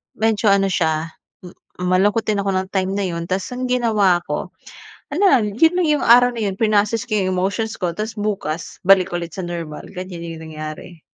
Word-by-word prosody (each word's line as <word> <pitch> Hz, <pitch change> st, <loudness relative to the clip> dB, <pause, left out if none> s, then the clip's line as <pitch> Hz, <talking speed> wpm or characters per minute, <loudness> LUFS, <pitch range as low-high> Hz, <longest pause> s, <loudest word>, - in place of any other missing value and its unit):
medyo 220 Hz, 0 st, +1 dB
ano 195 Hz, 0 st, +3 dB
siya 160 Hz, -1 st, 0 dB, 0.3 s
m 180 Hz, -1 st, -11 dB, 0.3 s
malungkot 205 Hz, +5 st, +2 dB
din 210 Hz, -, +1 dB
ako 195 Hz, -, 0 dB
nong 185 Hz, 0 st, -1 dB
time 190 Hz, -1 st, -1 dB
na 205 Hz, -, -1 dB
yun. 170 Hz, -1 st, -4 dB
Tas 185 Hz, +2 st, -2 dB
ang 255 Hz, -, -3 dB
ginawa 215 Hz, -8 st, +2 dB
ko -, -, -4 dB, 0.6 s
ano 365 Hz, -, -1 dB
lang, 210 Hz, -6 st, +2 dB
yun 325 Hz, +5 st, +5 dB
na 360 Hz, -, +2 dB
yung 300 Hz, -2 st, +1 dB
araw 245 Hz, +1 st, +6 dB
na 225 Hz, -, -3 dB
yun 190 Hz, -, -8 dB
prinocess 215 Hz, 0 st, +1 dB
ko 215 Hz, -, -1 dB
yung 185 Hz, -2 st, 0 dB
emotions 200 Hz, +4 st, -2 dB
ko 175 Hz, -2 st, -1 dB
tas 215 Hz, +1 st, -3 dB
bukas 190 Hz, -6 st, -3 dB
balik 190 Hz, -1 st, +5 dB
ulit 170 Hz, -2 st, -5 dB
sa 185 Hz, -2 st, -5 dB
normal 165 Hz, -3 st, -6 dB
ganyan 180 Hz, -2 st, -7 dB
yung 160 Hz, -, -10 dB
nangyari. 155 Hz, +2 st, -8 dB
195 Hz, 200 wpm, -20 LUFS, 175-220 Hz, 0.6 s, araw